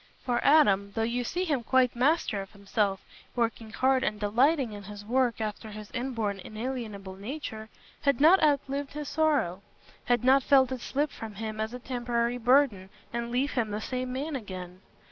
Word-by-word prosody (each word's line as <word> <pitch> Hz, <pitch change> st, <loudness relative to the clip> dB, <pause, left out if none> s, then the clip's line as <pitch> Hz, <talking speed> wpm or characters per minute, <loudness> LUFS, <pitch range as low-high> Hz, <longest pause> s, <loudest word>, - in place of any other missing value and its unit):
For 245 Hz, -2 st, 0 dB
Adam, 200 Hz, -10 st, +4 dB
though 225 Hz, -, +1 dB
you 240 Hz, +2 st, -1 dB
see 355 Hz, +9 st, -2 dB
him 295 Hz, -8 st, 0 dB
quite 250 Hz, +1 st, +2 dB
master 255 Hz, -5 st, +2 dB
of 195 Hz, -, -11 dB
himself, 200 Hz, -1 st, -1 dB, 0.3 s
working 230 Hz, -2 st, -1 dB
hard 260 Hz, +3 st, +2 dB
and 210 Hz, 0 st, -1 dB
delighting 245 Hz, +4 st, +2 dB
in 205 Hz, -, -7 dB
his 205 Hz, 0 st, -9 dB
work 245 Hz, 0 st, +1 dB
after 215 Hz, 0 st, -4 dB
his 215 Hz, 0 st, -9 dB
inborn 230 Hz, -6 st, -2 dB
inalienable 215 Hz, -3 st, -5 dB
nature, 220 Hz, 0 st, -6 dB, 0.3 s
had 280 Hz, -4 st, +2 dB
not 330 Hz, +6 st, +7 dB
outlived 280 Hz, -2 st, +1 dB
his 300 Hz, -1 st, -5 dB
sorrow—had 245 Hz, -, -1 dB
not 265 Hz, +2 st, +6 dB
felt 265 Hz, -1 st, +4 dB
it 255 Hz, -2 st, -4 dB
slip 290 Hz, +4 st, -1 dB
from 220 Hz, -2 st, -8 dB
him 215 Hz, +1 st, -4 dB
as 220 Hz, +1 st, -2 dB
a 250 Hz, -, -5 dB
temporary 240 Hz, -1 st, -1 dB
burden, 245 Hz, -6 st, +3 dB, 0.2 s
and 235 Hz, 0 st, -2 dB
leave 255 Hz, +4 st, 0 dB
him 235 Hz, -5 st, 0 dB
the 210 Hz, 0 st, -3 dB
same 255 Hz, +3 st, -3 dB
man 280 Hz, +4 st, -3 dB
again. 185 Hz, -6 st, -7 dB
240 Hz, 175 wpm, -28 LUFS, 210-265 Hz, 0.3 s, not